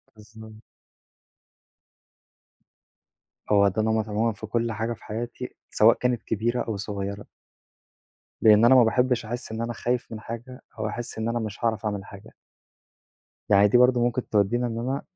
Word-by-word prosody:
بالضبط. 110 Hz, 0 st, -14 dB, 2.9 s
هو 100 Hz, -1 st, +5 dB
ده 100 Hz, +3 st, 0 dB
نمط 110 Hz, 0 st, 0 dB
عمومًا 110 Hz, +2 st, 0 dB
في 105 Hz, -, -9 dB
كل 115 Hz, +1 st, -1 dB
حاجة 115 Hz, +2 st, -2 dB
في -, -, -16 dB
حياتي، 120 Hz, +3 st, -6 dB
سواء 110 Hz, +2 st, +5 dB
كانت 125 Hz, -2 st, -1 dB
كبيرة 120 Hz, +3 st, -1 dB
أو 110 Hz, -3 st, -3 dB
صغيرة. 100 Hz, 0 st, -5 dB, 1.2 s
لإن 110 Hz, 0 st, +6 dB
أنا 130 Hz, +2 st, +7 dB
ما 125 Hz, -, +7 dB
باحبش 125 Hz, +1 st, +1 dB
أحس 120 Hz, +1 st, -6 dB
إن 110 Hz, +1 st, -4 dB
أنا 120 Hz, +1 st, -3 dB
خايف 120 Hz, +1 st, -2 dB
من 110 Hz, -, -6 dB
حاجة، 120 Hz, +3 st, -8 dB, 0.2 s
أو 110 Hz, -, -1 dB
أحس 115 Hz, +1 st, -6 dB
إن 110 Hz, +1 st, -2 dB
أنا 120 Hz, 0 st, -1 dB
مش 110 Hz, -2 st, -6 dB
هاعرف 110 Hz, -1 st, 0 dB
أعمل 100 Hz, -2 st, -3 dB
حاجة. 100 Hz, +2 st, -13 dB, 1.2 s
يعني 100 Hz, 0 st, +6 dB
دي 115 Hz, -, +4 dB
برضه 125 Hz, 0 st, +4 dB
ممكن 120 Hz, +1 st, -1 dB
تودينا 115 Hz, +4 st, +1 dB
إن 115 Hz, 0 st, -4 dB
أنا 130 Hz, +4 st, -2 dB
110 Hz, 160 wpm, -25 LUFS, 105-120 Hz, 2.9 s, أنا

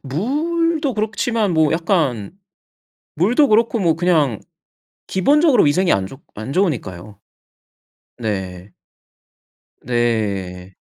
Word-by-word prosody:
물도 295 Hz, -, -1 dB
그렇지만 215 Hz, -1 st, -1 dB
뭐 160 Hz, -2 st, +2 dB
약간 160 Hz, -, -1 dB, 0.8 s
물도 240 Hz, -, +3 dB
그렇고 230 Hz, +2 st, +2 dB
뭐 170 Hz, -4 st, +2 dB
그냥 160 Hz, -, +1 dB, 0.7 s
기본적으로 285 Hz, -, +3 dB
위생이 175 Hz, +5 st, +2 dB
안 95 Hz, -1 st, 0 dB
좋 135 Hz, +8 st, -12 dB
안 110 Hz, +6 st, -6 dB
좋으니까요. 105 Hz, -, -2 dB, 1.0 s
네. 95 Hz, -4 st, -5 dB, 1.1 s
네. 100 Hz, -6 st, -2 dB
160 Hz, 195 characters per minute, -19 LUFS, -, 1.1 s, 물도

